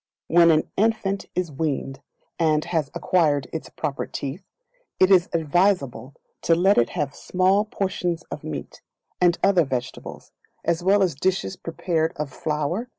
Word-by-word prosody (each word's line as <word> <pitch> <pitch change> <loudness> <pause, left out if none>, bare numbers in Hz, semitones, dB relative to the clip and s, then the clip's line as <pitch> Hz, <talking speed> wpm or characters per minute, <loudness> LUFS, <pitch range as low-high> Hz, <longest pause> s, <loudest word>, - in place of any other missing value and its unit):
When 170 0 +5
the 155 -1 +4
Infant 200 -2 0
Is 180 -3 -1
Weaned, 135 -2 -3 0.4
and 155 -2 +2
has 160 -5 -1
acquired 150 -6 +2
its 160 - -5
proper 140 - -4
teeth, 145 +7 -5 0.6
it 185 +1 +5
is 180 -2 +5
advisable 160 -5 0 0.3
to 165 - +3
let 190 +4 +4
it 120 - +2
have 140 -2 -1
small 190 +3 +2
portions 180 -5 -2
of 150 - -6
meat, 75 - -7 0.4
and 175 -1 +4
other 190 -4 +5
vegetables, 130 -4 -6 0.3
as 170 +1 0
well 195 +2 +4
as 180 - +1
dishes 145 - -1
prepared 165 -1 -2
of 150 -2 -4
flour, 155 +8 -2
&c. - - -37
170 Hz, 155 wpm, -24 LUFS, 150-185 Hz, 0.6 s, When